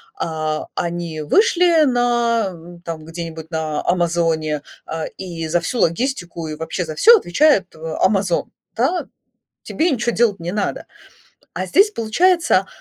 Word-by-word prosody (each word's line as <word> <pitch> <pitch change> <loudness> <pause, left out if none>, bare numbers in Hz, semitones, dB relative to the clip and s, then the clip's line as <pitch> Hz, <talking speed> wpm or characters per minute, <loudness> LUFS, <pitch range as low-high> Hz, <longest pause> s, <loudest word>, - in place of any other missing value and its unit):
а, 155 - -3
они 170 -2 -3
вышли 345 - +4
на, 240 -4 +1
м, 170 0 -13
там 165 -3 -7
где-нибудь 165 -1 -7
на 160 -2 -2
"Амазоне", 165 -4 0 0.2
а, 160 -1 -4
и 170 -4 -5
за 170 +2 +1
всю 235 +8 -3
логистику 175 -4 -1
и 155 - -4
вообще 160 +3 -3
за 155 -1 -6
всё 465 +1 +7
отвечает, 205 - +2
э, 160 0 -6
"Амазон" 195 -3 +1 0.2
да. 265 +11 0 0.6
Тебе 335 +3 0
ничё 240 -3 0
делать 215 -5 +1
не 170 +1 -3
надо. 205 0 -2 0.7
А - - -3
здесь, 410 +2 +4
получается, 330 - +2
175 Hz, 140 wpm, -20 LUFS, 165-240 Hz, 0.7 s, всё